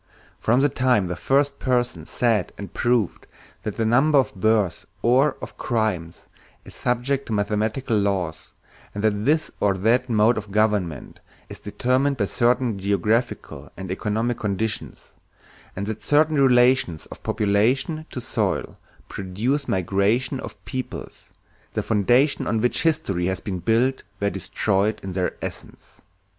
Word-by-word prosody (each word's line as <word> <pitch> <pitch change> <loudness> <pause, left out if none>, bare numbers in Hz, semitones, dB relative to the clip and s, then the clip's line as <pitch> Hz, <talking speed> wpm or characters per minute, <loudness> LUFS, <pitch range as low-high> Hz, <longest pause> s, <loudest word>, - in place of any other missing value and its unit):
From 120 +4 +2
the 145 - +5
time 125 -7 +2
the 90 0 -3
first 140 +8 +1
person 120 -10 -1
said 115 -6 0
and 100 -2 -8
proved 120 -5 0 0.3
that 105 - -4
the 115 - 0
number 135 +7 +4
of 135 - +2
births 105 -1 +1 0.2
or 130 +4 +3
of - - -9
crimes 105 -9 -2 0.4
is - - -12
subject 130 +3 -1
to 110 - -3
mathematical 110 +4 0
laws, 95 -6 -2 0.4
and 100 - -3
that 105 -1 +1
this 155 +3 +2
or 100 -2 +2
that 120 +6 +2
mode 110 +1 +3
of 105 -1 -10
government 100 -7 0 0.3
is - - -9
determined 130 +3 0
by 105 - +1
certain 120 0 +1
geographical 100 +5 -1
and 95 -1 -6
economic 110 +5 -1
conditions, 105 +1 -3 0.6
and 95 - -3
that 110 0 -5
certain 150 0 +3
relations 125 - +3
of - - -10
population 125 +10 +1
to - - -5
soil 120 - -2 0.3
produce 110 +10 -2
migrations 100 - +1
of - - -10
peoples, 130 -1 -6 0.5
the - - 0
foundations 120 +7 +2
on 115 - +1
which 125 +2 +1
history 150 - 0
had 95 0 -2
been 95 -3 -3
built 115 +8 +1 0.2
were 100 0 0
destroyed 100 +2 0
in 95 - -5
their 90 0 -1
essence. - - -8
110 Hz, 145 wpm, -23 LUFS, 100-130 Hz, 0.6 s, the